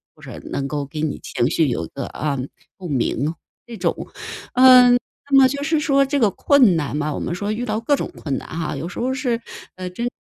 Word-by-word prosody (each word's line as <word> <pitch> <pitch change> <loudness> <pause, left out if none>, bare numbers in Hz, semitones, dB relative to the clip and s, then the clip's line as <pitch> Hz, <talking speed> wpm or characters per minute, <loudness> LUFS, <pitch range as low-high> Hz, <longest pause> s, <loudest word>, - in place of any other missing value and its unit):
或 - - -21
是 - - -9
能 135 - -2
够 145 0 -3
给 150 +2 -6
你 155 -2 -2
情 120 +2 -1
绪 160 -1 +2
有 85 -10 -2
一 - - -13
个， - - -4
啊， 145 -3 -3 0.4
共 180 -4 -7
鸣 140 +3 0 0.3
这 235 - -9
种。 175 -5 -1 0.6
嗯， 255 -1 +8 0.4
那 275 - +6
么 265 - +8
就 280 +2 -3
是 315 +1 +1
说 275 -2 +3
这 285 +1 -1
个 220 -5 +4
困 260 - +4
难 145 -3 -2
嘛， 150 0 -1
我 - - -4
们 - - -3
说 205 +4 -3
遇 235 +3 -3
到 215 -1 -1
各 260 +6 +2
种 - - -4
困 140 -4 -3
难 - - -8
哈， 160 -2 -4
有 145 +5 -5
时 - - -7
候 255 +2 0
是， 245 -4 -1 0.3
呃， 185 0 -5
真 235 +7 -3
190 Hz, 255 characters per minute, -21 LUFS, -, 0.6 s, 嗯